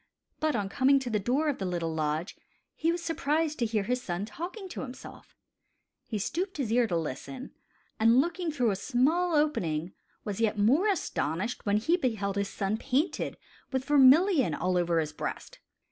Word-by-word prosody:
But 310 Hz, -3 st, +1 dB
on 205 Hz, -3 st, -1 dB
coming 270 Hz, +6 st, +3 dB
to 260 Hz, -3 st, -3 dB
the 210 Hz, -, +1 dB
door 255 Hz, +10 st, 0 dB
of 285 Hz, -8 st, -1 dB
rhe 190 Hz, -, -1 dB
little 170 Hz, -2 st, -2 dB
lodge, 155 Hz, +3 st, -2 dB, 0.4 s
he 330 Hz, +2 st, 0 dB
was 340 Hz, 0 st, -3 dB
surprised 315 Hz, -1 st, 0 dB
to 235 Hz, -, +1 dB
hear 215 Hz, -2 st, 0 dB
his 250 Hz, +4 st, -1 dB
son 180 Hz, -3 st, -3 dB
talking 350 Hz, -, -7 dB
to -, -, -6 dB
himself. 260 Hz, -1 st, -10 dB, 0.7 s
He 220 Hz, -, -3 dB
stooped 360 Hz, -, -3 dB
his 255 Hz, -7 st, -2 dB
ear 240 Hz, 0 st, +3 dB
to 175 Hz, -5 st, 0 dB
listen, 210 Hz, -, -5 dB, 0.5 s
and, 230 Hz, +3 st, +5 dB
looking 345 Hz, +3 st, 0 dB
through 250 Hz, -7 st, +1 dB
a -, -, -1 dB
small 300 Hz, -, +1 dB
opening, 175 Hz, -, 0 dB, 0.3 s
was 205 Hz, +1 st, -4 dB
yet 220 Hz, -1 st, +1 dB
more 265 Hz, -, +3 dB
astonished 205 Hz, -, -2 dB
when 205 Hz, +1 st, +3 dB
he 325 Hz, +12 st, +2 dB
beheld 215 Hz, -, -1 dB
his 200 Hz, -1 st, -1 dB
son 200 Hz, +2 st, -2 dB
painted 275 Hz, +8 st, -1 dB, 0.3 s
with 260 Hz, -1 st, -1 dB
vermillion 285 Hz, -, +5 dB
over 175 Hz, -2 st, 0 dB
all -, -, +4 dB
his 150 Hz, -1 st, -5 dB
breast. -, -, -6 dB
245 Hz, 180 wpm, -29 LUFS, 195-300 Hz, 0.7 s, and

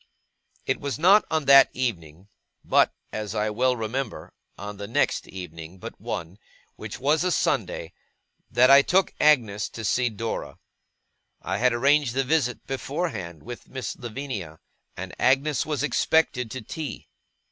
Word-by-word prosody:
It 130 Hz, -, 0 dB
was 140 Hz, -1 st, -3 dB
not 190 Hz, +7 st, +5 dB
on 160 Hz, -2 st, 0 dB
that 140 Hz, 0 st, +8 dB
evening; 90 Hz, -8 st, -4 dB, 0.4 s
but, -, -, +4 dB, 0.2 s
as 110 Hz, -1 st, -4 dB
I 105 Hz, 0 st, 0 dB
well 125 Hz, +4 st, +2 dB
remember, 115 Hz, +2 st, -4 dB, 0.2 s
on 105 Hz, 0 st, -7 dB
the 100 Hz, 0 st, -6 dB
next 115 Hz, -, 0 dB
evening 85 Hz, -1 st, -9 dB
but -, -, -10 dB
one, 85 Hz, +5 st, -5 dB, 0.4 s
which 105 Hz, -1 st, -8 dB
was 150 Hz, +5 st, +2 dB
a 180 Hz, -, +1 dB
Sunday; 150 Hz, -, -1 dB, 0.6 s
that 125 Hz, +2 st, +5 dB
I 140 Hz, 0 st, +9 dB
took 185 Hz, +6 st, +2 dB
Agnes 115 Hz, -9 st, +3 dB
to 115 Hz, -, -7 dB
see 125 Hz, +5 st, +2 dB
Dora. 115 Hz, +1 st, -5 dB, 0.9 s
I 95 Hz, +2 st, -2 dB
had 125 Hz, +1 st, +4 dB
arranged 135 Hz, +1 st, +2 dB
the 135 Hz, -, +2 dB
visit, 135 Hz, -3 st, 0 dB
beforehand, 135 Hz, -, -4 dB
with 120 Hz, +2 st, -9 dB
Miss 130 Hz, -2 st, -5 dB
Lavinia; 115 Hz, -, -6 dB, 0.4 s
and 95 Hz, 0 st, -6 dB
Agnes 135 Hz, +3 st, +2 dB
was 150 Hz, -2 st, -1 dB
expected 150 Hz, -5 st, +1 dB
to 130 Hz, +1 st, -6 dB
tea. 155 Hz, +6 st, -6 dB
125 Hz, 145 wpm, -25 LUFS, 105-140 Hz, 0.9 s, I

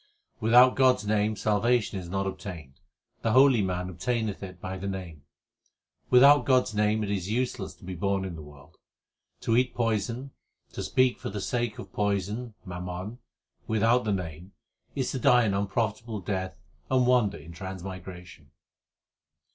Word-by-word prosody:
Without 125 Hz, +3 st, +6 dB
God 130 Hz, -1 st, +5 dB
s 105 Hz, -, -9 dB
name 105 Hz, +1 st, +1 dB
salvation 105 Hz, 0 st, +1 dB
is 90 Hz, -2 st, -9 dB
not 95 Hz, +1 st, -1 dB
obtained; 90 Hz, -8 st, -7 dB, 0.4 s
the 115 Hz, -, +1 dB
holy 130 Hz, -3 st, +6 dB
man 90 Hz, -1 st, -2 dB
obtaineth 110 Hz, +2 st, -2 dB
it 90 Hz, -2 st, -8 dB
by 95 Hz, +1 st, -5 dB
the 95 Hz, +1 st, -5 dB
Name. 90 Hz, -7 st, -6 dB, 0.8 s
Without 140 Hz, +3 st, +7 dB
God 130 Hz, -2 st, +4 dB
s -, -, -7 dB
name 105 Hz, +1 st, +1 dB
it 100 Hz, -, -3 dB
is 95 Hz, -2 st, -2 dB
useless 115 Hz, -4 st, -2 dB
to -, -, -22 dB
be 95 Hz, -, -5 dB
born 95 Hz, +2 st, -1 dB
in 95 Hz, -, -5 dB
the 80 Hz, -, -8 dB
world. 75 Hz, +1 st, -15 dB, 0.6 s
To 115 Hz, -, +1 dB
eat 125 Hz, +1 st, +2 dB
poison, 115 Hz, +3 st, -1 dB, 0.4 s
to -, -, -5 dB
speak 130 Hz, -1 st, +2 dB
for -, -, -5 dB
the 100 Hz, +1 st, -5 dB
sake 120 Hz, +1 st, -2 dB
of -, -, -10 dB
poison 105 Hz, +3 st, -2 dB
(mammon) 90 Hz, +5 st, -6 dB, 0.5 s
without 115 Hz, +3 st, +3 dB
the 110 Hz, -, -1 dB
Name 90 Hz, -1 st, -5 dB, 0.4 s
is 135 Hz, -3 st, -1 dB
to 130 Hz, -, -3 dB
die 125 Hz, -1 st, +5 dB
an 105 Hz, -3 st, +1 dB
unprofitable 110 Hz, +2 st, -2 dB
death 95 Hz, 0 st, -3 dB, 0.3 s
and 130 Hz, -1 st, +3 dB
wander 120 Hz, -5 st, +3 dB
in 75 Hz, +3 st, -12 dB
transmigration. 90 Hz, -3 st, -9 dB
105 Hz, 165 wpm, -27 LUFS, 95-120 Hz, 0.8 s, Without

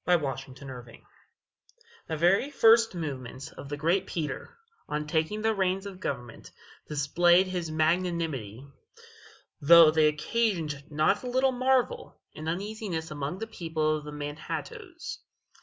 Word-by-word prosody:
ANTONY 155 Hz, -7 st, +2 dB
VAN 130 Hz, -, -12 dB
CORLEAR 125 Hz, -3 st, -10 dB, 1.1 s
The 160 Hz, -, -3 dB
very 185 Hz, -, +3 dB
first 230 Hz, -6 st, +5 dB
movements 135 Hz, -5 st, -6 dB
of 140 Hz, -, -10 dB
the 145 Hz, -, -4 dB
great 175 Hz, +5 st, +1 dB
Peter, 150 Hz, -5 st, -5 dB, 0.3 s
on 150 Hz, 0 st, -2 dB
taking 160 Hz, +8 st, -1 dB
the 225 Hz, 0 st, +3 dB
reins 190 Hz, -1 st, 0 dB
of 195 Hz, -2 st, -8 dB
government, 120 Hz, -8 st, -5 dB, 0.4 s
displayed 175 Hz, +5 st, +3 dB
his 180 Hz, -3 st, -3 dB
magnanimity, 155 Hz, -, -1 dB, 1.0 s
though 165 Hz, +1 st, +8 dB
they 155 Hz, -1 st, +4 dB
occasioned 155 Hz, -3 st, -1 dB
not 155 Hz, +7 st, +2 dB
a 255 Hz, -, -6 dB
little 260 Hz, +2 st, +2 dB
marvel 255 Hz, -1 st, 0 dB, 0.2 s
and 155 Hz, +1 st, -5 dB
uneasiness 190 Hz, -3 st, -4 dB
among 145 Hz, +3 st, -4 dB
the 225 Hz, -, -4 dB
people 160 Hz, -7 st, -1 dB
of 150 Hz, -, -9 dB
the 150 Hz, -, -8 dB
Manhattoes. 240 Hz, -, -6 dB
165 Hz, 135 wpm, -28 LUFS, 150-195 Hz, 1.1 s, though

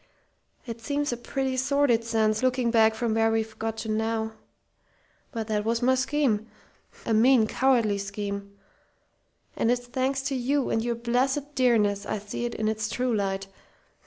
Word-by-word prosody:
It 230 Hz, -2 st, -7 dB
seems 285 Hz, +2 st, -1 dB
a -, -, -1 dB
pretty 265 Hz, +2 st, -2 dB
sordid 265 Hz, -3 st, +2 dB
sense, 220 Hz, -1 st, +1 dB
looking 255 Hz, -2 st, +1 dB
back 220 Hz, -1 st, +4 dB
from 230 Hz, -1 st, -1 dB
where 225 Hz, 0 st, +3 dB
we've 225 Hz, 0 st, -2 dB
got 225 Hz, 0 st, -3 dB
to 220 Hz, -, -5 dB
now. 220 Hz, 0 st, -1 dB, 1.0 s
But 225 Hz, -5 st, -3 dB
that 210 Hz, -1 st, -1 dB
was 230 Hz, +2 st, 0 dB
my 260 Hz, +1 st, +4 dB
scheme. 260 Hz, -5 st, +1 dB, 0.6 s
A 230 Hz, -, 0 dB
mean, 235 Hz, +1 st, +5 dB
cowardly 230 Hz, -4 st, +2 dB
scheme! 200 Hz, 0 st, -5 dB, 1.0 s
And 230 Hz, -, +1 dB
it's 245 Hz, 0 st, 0 dB
thanks 260 Hz, +2 st, -1 dB
to 275 Hz, 0 st, -1 dB
you 265 Hz, +2 st, 0 dB
and 225 Hz, -, +1 dB
your 240 Hz, 0 st, -1 dB
blessed 265 Hz, +5 st, 0 dB
dearness 210 Hz, -6 st, +2 dB
I -, -, -1 dB
see 210 Hz, +3 st, -5 dB
it 240 Hz, -, -4 dB
in 215 Hz, -, -1 dB
its 220 Hz, 0 st, -1 dB
true 250 Hz, 0 st, 0 dB
light.... 195 Hz, -1 st, -1 dB
230 Hz, 165 wpm, -26 LUFS, 220-255 Hz, 1.0 s, mean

